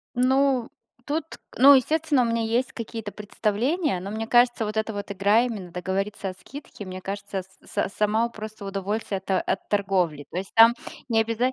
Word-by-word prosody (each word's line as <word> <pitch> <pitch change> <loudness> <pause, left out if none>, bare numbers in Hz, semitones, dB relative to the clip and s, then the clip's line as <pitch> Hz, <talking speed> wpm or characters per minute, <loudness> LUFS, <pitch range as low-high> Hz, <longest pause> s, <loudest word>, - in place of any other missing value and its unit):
Ну 260 -1 +2 0.4
тут, 300 +2 -1 0.3
ну, 280 +2 +9
естественно, 295 +1 +2
у - - +2
меня 230 0 0
есть 235 +3 0
какие-то 225 -2 -6
представления, 220 - -1
но, 195 +2 -6
мне 220 +1 -3
кажется, 240 -2 +3
вот 215 +1 -5
эта 220 0 -1
вот 200 0 -6
игра 200 +4 +3
именно 210 -8 -4
договориться 195 +3 -3
о 185 - -5
скидке, 270 -1 -10
мне 185 0 -7
кажется, 195 -1 -5 0.2
с - - -18
са - - 0
сама, 215 +3 +1
у, - - -8
просто 215 -2 -8
удовольствие 195 +1 -2
от - - -8
от 190 0 -1
торговли. 185 -8 0
То - - -7
есть 195 - -6
там 230 +1 +8 0.3
не 225 -1 +3
обяза 230 +3 0
220 Hz, 185 wpm, -25 LUFS, 195-245 Hz, 0.4 s, ну